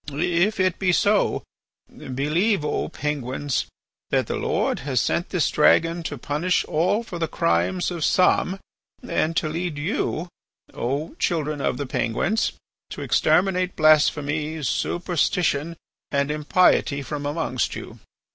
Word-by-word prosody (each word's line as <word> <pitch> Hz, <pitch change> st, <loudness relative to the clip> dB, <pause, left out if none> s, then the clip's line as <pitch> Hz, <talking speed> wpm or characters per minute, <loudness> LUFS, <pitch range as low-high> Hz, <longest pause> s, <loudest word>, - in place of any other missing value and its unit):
If 175 Hz, +7 st, +1 dB
it 185 Hz, -2 st, +1 dB
be 185 Hz, -2 st, +2 dB
so, 205 Hz, +3 st, +2 dB, 0.5 s
believe, 150 Hz, -, 0 dB
O 150 Hz, -, -1 dB
Penguins, 140 Hz, -3 st, -2 dB, 0.4 s
that -, -, +1 dB
the -, -, -3 dB
Lord -, -, 0 dB
has 135 Hz, -3 st, -1 dB
sent 170 Hz, -, 0 dB
this 180 Hz, -5 st, +1 dB
dragon 165 Hz, +2 st, +3 dB
to 145 Hz, -, -6 dB
punish 150 Hz, +8 st, 0 dB
all 185 Hz, +8 st, +1 dB
for 180 Hz, -6 st, -7 dB
the 165 Hz, -, 0 dB
crimes 90 Hz, -, 0 dB
of 170 Hz, -3 st, -3 dB
some, 185 Hz, +2 st, +2 dB, 0.5 s
and 165 Hz, +1 st, 0 dB
to 155 Hz, -, +1 dB
lead 165 Hz, 0 st, -3 dB
you, 165 Hz, +1 st, -2 dB, 0.5 s
O 140 Hz, +6 st, -3 dB
children 150 Hz, -3 st, -1 dB
of -, -, 0 dB
the 145 Hz, -, -3 dB
Penguins, 130 Hz, -, 0 dB, 0.4 s
to -, -, -6 dB
exterminate 185 Hz, -1 st, +2 dB
blasphemy, 155 Hz, 0 st, +2 dB
superstition, 170 Hz, +1 st, 0 dB, 0.3 s
and 140 Hz, 0 st, 0 dB
impiety 150 Hz, -2 st, +2 dB
from 145 Hz, +1 st, -4 dB
amongst 145 Hz, -4 st, -1 dB
you. -, -, -9 dB
155 Hz, 130 wpm, -23 LUFS, 145-180 Hz, 0.5 s, dragon